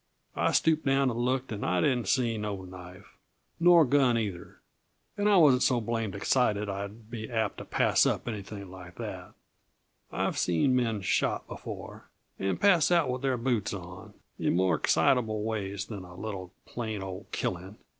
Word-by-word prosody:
I - - +1
stooped 160 -1 +2
down 135 -1 +2
and 115 - -4
looked, 130 +1 -1
and 105 -2 -4
I 90 - +1
didn't 125 -1 +1
see 120 -1 +1
no 105 -3 -4
knife 90 +1 -11 0.5
nor 170 -1 +7
gun, 130 -3 +3
either. 100 -6 -4 0.6
And 205 0 +1
I 205 - +5
wasn't 140 -7 +6
so 125 -2 +3
blamed 115 -3 -2
excited 105 -1 +1
I'd 100 +3 -6
be 110 -2 -6
apt 110 -4 -1
to - - -8
pass - - +3
up - - -1
anything 100 -3 -6
like 90 -2 -11
that; - - -7 0.8
I've - - -1
seen 90 +10 +2
men 115 -4 0
shot 95 - 0
before, - - -9 0.3
and 95 -2 -1
pass 185 -6 +4
out 170 -7 +3
with 125 0 -3
their 135 -2 0
boots 115 -5 -1
on, 90 -1 -10 0.2
in - - +1
more 90 0 +3
excitable 110 - +2
ways 100 -3 -3
than 105 -3 -7
a 90 -1 -12
little, 95 -2 -6
plain, 110 -4 -4
old 95 -1 -7
killing. 95 +3 -4
110 Hz, 170 wpm, -29 LUFS, 95-125 Hz, 0.8 s, nor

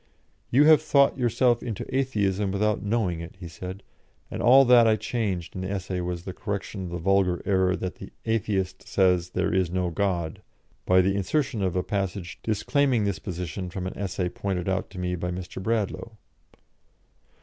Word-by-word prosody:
"You 135 +5 +5
have 155 0 +7
thought 140 -1 +3
yourself 120 0 +2
into 110 -5 -4
Atheism 105 -7 0
without 105 +2 0
knowing 100 -5 0
it," 85 0 -8
he 90 - -7
said, 95 +4 -8 0.5
and - - -4
all 135 +3 +7
that 120 -2 +7
I 110 - +5
changed 100 -6 -3
in 95 - -5
the 95 - -3
essay 95 -2 -3
was 90 -1 -4
the 95 - -6
correction 100 -1 -4
of - - -6
the 85 - -4
vulgar 90 0 +2
error 95 -2 +2
that 90 0 -5
the - - -9 0.2
Atheist 105 -4 -1
says 90 -2 +2
"there - - -1
is 95 -2 +2
no 90 0 -1
God," 85 -4 -1 0.5
by 90 0 +6
the 95 +1 +1
insertion 115 +4 0
of 95 -2 0
a 90 - +1
passage 95 -3 -3
disclaiming 125 +2 +1
this 100 -2 -1
position 90 0 -5
from 90 +1 -5
an 95 - -5
essay 95 -2 -2
pointed 90 0 -3
out 95 0 -1
to 95 - -12
me 90 0 -2
by 90 +1 -3
Mr. 90 +1 -6
Bradlaugh. 110 +1 -1
95 Hz, 180 wpm, -26 LUFS, 90-110 Hz, 0.5 s, have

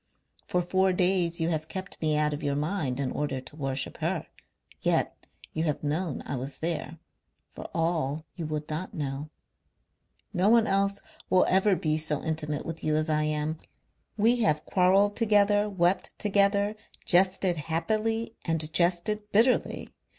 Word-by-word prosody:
For 180 0 +1
four 190 +1 +2
days 180 -2 +1
you 165 0 +1
have 155 -2 -2
kept 190 +2 -7
me 155 -1 +1
out 150 0 +1
of 145 - -5
your 145 -1 -1
mind 145 -4 -1
in 135 -2 -1
order 145 -3 -2
to 130 +2 -12
worship 135 -2 -3
her. - - -1 0.6
Yet - - +1 0.4
you 160 +1 -1
have 150 -2 -1
known 155 +1 -2
I 140 - -3
was 135 +3 -5
there 160 -1 -3 0.6
for - - -8
all 160 -2 -1
you 165 -3 -4
would 150 -1 -3
not 160 +5 -5
know. 145 0 -4 1.0
No 190 +2 +3
one 230 -1 +5
else 200 0 +1 0.3
will 185 - +5
ever 190 +1 +3
be 155 -2 0
so 155 -2 -2
intimate 155 -2 -2
with 165 0 -6
you 155 0 +1
as 155 +1 0
I 150 0 +1
am. 155 +1 -2 0.6
We 230 +4 +4
have 155 -10 +1
quarrelled 195 +2 +3
together, 210 -2 +3
wept 185 -1 0
together, 200 0 +2 0.3
jested 185 -1 +4
happily 215 +9 -1
and 160 -2 -2
jested 185 +5 +1
bitterly. 235 +5 +2
170 Hz, 160 wpm, -28 LUFS, 150-195 Hz, 1.0 s, one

